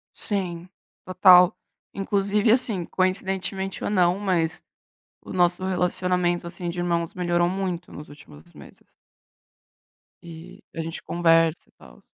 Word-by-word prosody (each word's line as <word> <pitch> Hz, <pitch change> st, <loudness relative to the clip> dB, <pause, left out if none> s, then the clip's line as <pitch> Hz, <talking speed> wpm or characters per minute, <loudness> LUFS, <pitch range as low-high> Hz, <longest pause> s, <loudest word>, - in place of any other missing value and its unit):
Sim, 180 Hz, -4 st, -4 dB, 0.4 s
total. 180 Hz, -1 st, +6 dB, 0.4 s
Inclusive, 200 Hz, +2 st, +1 dB
assim, 220 Hz, -8 st, +1 dB
coincidentemente, 190 Hz, 0 st, -2 dB
ou -, -, -1 dB
não, 180 Hz, -2 st, +2 dB
mas 175 Hz, -5 st, -1 dB, 0.6 s
o -, -, -10 dB
nosso 175 Hz, 0 st, +1 dB
relacionamento, 180 Hz, -1 st, -1 dB
assim, 175 Hz, 0 st, -5 dB
de 175 Hz, -, -7 dB
irmãos 170 Hz, -1 st, -1 dB
melhorou 175 Hz, -1 st, +1 dB
muito 185 Hz, -2 st, -4 dB
nos 150 Hz, -, -10 dB
últimos 85 Hz, -, -16 dB
meses. -, -, -16 dB, 1.3 s
E 170 Hz, +2 st, -12 dB
a 165 Hz, -, -3 dB
gente 165 Hz, 0 st, -5 dB
conversa 165 Hz, -1 st, +1 dB
e -, -, -30 dB
tal. -, -, -18 dB
180 Hz, 125 wpm, -24 LUFS, 170-190 Hz, 1.3 s, total